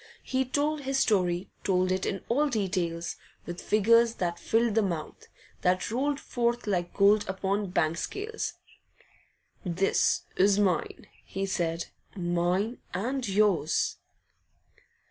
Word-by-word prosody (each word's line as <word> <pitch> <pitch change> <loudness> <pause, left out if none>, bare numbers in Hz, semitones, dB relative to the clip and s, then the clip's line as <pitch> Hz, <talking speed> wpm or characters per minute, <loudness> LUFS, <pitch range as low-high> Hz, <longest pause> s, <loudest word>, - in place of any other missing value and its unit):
And - - -24
he 265 0 +1
told 290 +3 0
his 270 0 -1
story, 185 -6 +1
told 185 -1 +2
it 185 0 0
in 195 - -3
all 290 +5 +2
details, 180 -7 -2 0.3
with 175 0 -6
figures 230 +2 +4
that 170 -1 -2
filled 230 0 +2
the 225 - +3
mouth, 170 -6 -4 0.3
that 185 +2 +1
rolled 275 +4 0
forth 240 -3 -1
like 180 -4 -1
gold 205 +1 +5
upon 195 +2 0
the 205 - -4
bank 165 -2 0
scales. 435 +2 -4 1.1
'This 185 +2 +1
is 195 +1 +4
mine,' 185 -6 0 0.2
he 195 0 -3
said, 170 -3 -2 0.3
'mine 180 +5 0 0.2
and 250 +6 -2
yours. 195 -6 +2
195 Hz, 130 wpm, -28 LUFS, 180-235 Hz, 1.1 s, gold